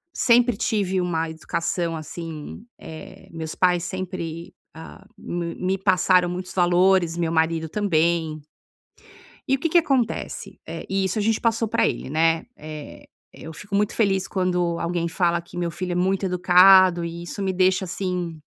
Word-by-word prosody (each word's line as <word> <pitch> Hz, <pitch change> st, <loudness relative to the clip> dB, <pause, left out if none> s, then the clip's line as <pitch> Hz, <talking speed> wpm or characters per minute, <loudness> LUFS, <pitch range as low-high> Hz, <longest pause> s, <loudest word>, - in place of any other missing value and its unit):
Sempre 240 Hz, -2 st, +3 dB
tive 195 Hz, -5 st, 0 dB
uma 165 Hz, -2 st, -1 dB
educação 165 Hz, +1 st, -3 dB
assim, 160 Hz, +3 st, -8 dB
eh 160 Hz, -1 st, -11 dB
meus 160 Hz, -1 st, -6 dB
pais 180 Hz, -2 st, +2 dB
sempre, 175 Hz, -3 st, -5 dB, 0.2 s
ah, 160 Hz, 0 st, -12 dB
me 170 Hz, -1 st, -5 dB
me 185 Hz, +1 st, -1 dB
passaram 185 Hz, -2 st, +3 dB
muitos 180 Hz, +1 st, -6 dB
valores, 175 Hz, -1 st, +3 dB
meu 170 Hz, -2 st, -1 dB
marido 160 Hz, 0 st, 0 dB
também. 165 Hz, -5 st, 0 dB, 1.1 s
E 270 Hz, -, +2 dB
o -, -, -14 dB
que 330 Hz, -, -1 dB
que 345 Hz, -, +4 dB
acontece? 265 Hz, -8 st, -1 dB
Eh, -, -, -7 dB
e 195 Hz, 0 st, 0 dB
isso 190 Hz, +3 st, -1 dB
a -, -, 0 dB
gente 220 Hz, +1 st, +1 dB
passou 225 Hz, -1 st, +1 dB
pra -, -, +2 dB
ele, -, -, -3 dB
né. 165 Hz, +5 st, +1 dB
Eh, 155 Hz, -1 st, -10 dB, 0.3 s
eu 160 Hz, -, -10 dB
fico 200 Hz, +6 st, -9 dB
muito 205 Hz, +1 st, +1 dB
feliz 195 Hz, -4 st, +1 dB
quando 180 Hz, -3 st, -1 dB
alguém 170 Hz, 0 st, -2 dB
fala 170 Hz, 0 st, 0 dB
que 175 Hz, +1 st, -10 dB
meu 175 Hz, -1 st, -1 dB
filho 180 Hz, +1 st, -4 dB
é -, -, -1 dB
muito 190 Hz, +2 st, 0 dB
educado 180 Hz, -1 st, +6 dB
e 170 Hz, 0 st, -6 dB
isso 185 Hz, +3 st, -6 dB
me 190 Hz, -1 st, 0 dB
deixa, 185 Hz, +1 st, +2 dB
assim, 180 Hz, -3 st, -4 dB
180 Hz, 165 wpm, -23 LUFS, 165-190 Hz, 1.1 s, educado